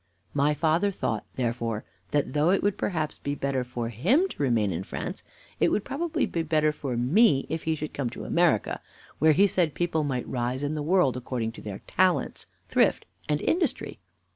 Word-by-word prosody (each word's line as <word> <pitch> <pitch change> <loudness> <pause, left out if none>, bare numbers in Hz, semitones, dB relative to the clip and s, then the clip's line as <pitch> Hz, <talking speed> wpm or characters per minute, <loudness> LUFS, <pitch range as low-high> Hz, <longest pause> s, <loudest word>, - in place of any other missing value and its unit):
My 145 +1 +2
father 165 +6 +2
thought, 110 - -3
therefore, 115 -3 -2 0.2
that, 145 -3 0
though 150 +3 +3
it 195 - +2
would 205 -1 +2
perhaps 160 -7 -2
be 145 0 -3
better 135 -2 -1
for 120 -2 -4
him 200 - +2
to - - -7
remain 115 -7 +2
in 85 0 -2
France, - - -5 0.4
It - - +4
would 210 - 0
probably 305 +5 -1
be 170 - -2
better 155 -1 +2
for 135 -5 -4
me 140 - +4
if 160 0 -3
he 160 0 +1
should 155 0 -5
come 135 -4 -2
to - - -8
America, - - +2 0.4
where 155 +1 +5
he 195 +7 +5
said 175 -7 +1
people 170 -3 0
might 130 -4 -2
rise 125 +2 -2
in 145 +1 -1
the 155 - -2
world, 155 -4 +3
according 120 -2 -3
to - - -11
their 100 -2 -7
talents, 185 -1 +1 0.2
thrift, - - +2 0.2
and 150 0 +1
industry. 345 0 0
150 Hz, 190 wpm, -27 LUFS, 125-170 Hz, 0.4 s, where